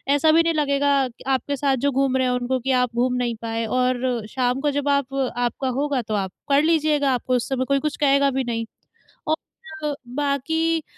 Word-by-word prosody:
ऐसा 310 +2 +4
भी 330 - +5
नहीं 330 - +1
लगेगा, 280 -2 +2
क - - -16 0.2
आपके 270 +1 0
साथ 275 0 +1
जो 285 - +3
घूम 270 0 +1
रहे 260 - +1
हैं 250 - +1
उनको 250 +1 -1
कि 265 +2 -2
आप 240 -1 -2
घूम 250 +1 +1
नहीं 235 -1 -1
पाए 230 0 -2
और 250 -2 0
शाम 250 0 0
को 295 -1 +1
जब 285 0 -1
आप 275 -1 -4 0.2
आपका 245 +2 -1
होगा, 285 -3 0
तो 220 -1 -5
आप 190 -2 -2 0.2
पढ़ 280 +1 +4
लीजिएगा, 305 -4 +2
आपको 255 +1 0
उस 245 - -1
समय 260 -1 0
कोई 275 +1 +1
कुछ 295 - -4
कहेगा 280 -1 +3
भी 265 0 -1
नहीं। 230 -1 -2 1.2
और 295 -1 -1 0.2
बाक़ी, 315 +3 0
270 Hz, 210 wpm, -23 LUFS, 250-285 Hz, 1.2 s, भी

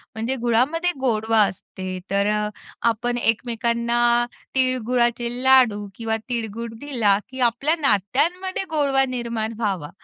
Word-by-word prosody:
म्हणजे 230 +4 -2
गुळामध्ये 295 +10 +2
गोडवा 225 -3 +2
असते 185 -1 -5
तर 200 +1 +2
अ, 210 0 0 0.4
आपण 240 +2 -1
एकमेकांना 235 +1 +1 0.3
तिळगुळाचे 245 -2 +1
लाडू 245 -6 +4
किंवा 225 -1 -2
तिळगुळ 230 -1 -3 0.2
दिला 220 -8 +2
की 260 0 -9
आपल्या 275 +8 0
नात्यांमध्ये 300 - +1
गोडवा 280 -4 +2
निर्माण 230 -2 -3
व्हावा, 190 -9 -2
235 Hz, 115 wpm, -22 LUFS, 220-260 Hz, 0.4 s, लाडू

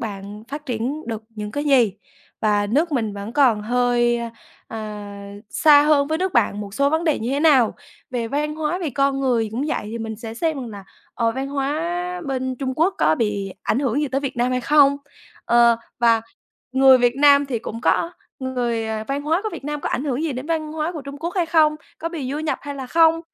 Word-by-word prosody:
bạn 205 -1 -6
phát 295 +2 -7
triển 255 +6 -3
được 225 -2 -4
những 210 -2 -6
cái 290 +6 -3
gì 255 -8 +4 0.5
và 205 -1 +2
nước 300 +10 +1
mình 225 -6 0
vẫn 200 +2 -6
còn 250 -7 +3
hơi, 240 +1 +2 0.5
à, 205 -2 -7 0.2
xa 295 -2 +6
hơn 295 -1 +3
với 315 0 0
nước 375 +1 -1
bạn 210 -5 +2
một 200 -1 -7
số 280 +2 +2
vấn 320 +2 0
đề 310 -4 +2
như 235 +3 -3
thế 280 - 0
nào. 280 -8 +4 0.4
Về 235 -3 -2
văn 300 +3 -1
hóa, 315 +3 -2
về 335 -5 -3
con 275 +1 +1
người 240 -5 +1
cũng 240 +6 -2
vậy, - - -1
thì 230 - -5
mình 220 -1 -5
sẽ 225 0 -7
xem 320 +5 -1
rằng 245 - -6
là, 200 -2 -9 0.3
ờ, 230 -1 +1
văn 265 +3 -4
hóa 335 +6 -2
bên 260 -1 -2
Trung 260 0 -3
Quốc 335 +7 +2
có 155 +1 +4
bị 200 -1 -2
ảnh 225 - 0
hưởng 270 0 0
gì 295 - -1
tới 270 +1 -1
Việt 275 -3 -4
Nam 245 +1 +1
hay 255 0 0
không, 280 +2 +5 0.5
ờ, 235 0 +5 0.2
và 230 -1 +4 0.5
người 265 0 +7
Việt 245 0 +2
Nam 285 0 +6
thì 250 -4 -2
cũng 225 +1 -7
có 335 +6 +1 0.3
người 245 -4 -2
ờ, 220 0 -3
văn 280 +1 -2
hóa 320 +6 +1
của 435 - -2
Việt 320 -5 -8
Nam 295 0 -3
có - - -2
ảnh 265 - -2
hưởng 275 0 -1
gì 320 -3 -1
đến 255 +2 -6
văn 310 -2 -2
hóa 315 +2 -2
của 310 -4 -6
Trung 280 +1 -8
Quốc 340 +3 -4
hay 355 -3 +1
không, 315 -2 +3 0.2
có 330 - -3
bị 300 -7 -5
du 295 - -2
nhập 310 0 -2
hay 285 0 -6
là 265 -2 -6
không. 330 +3 +4
265 Hz, 230 wpm, -22 LUFS, 230-300 Hz, 0.5 s, người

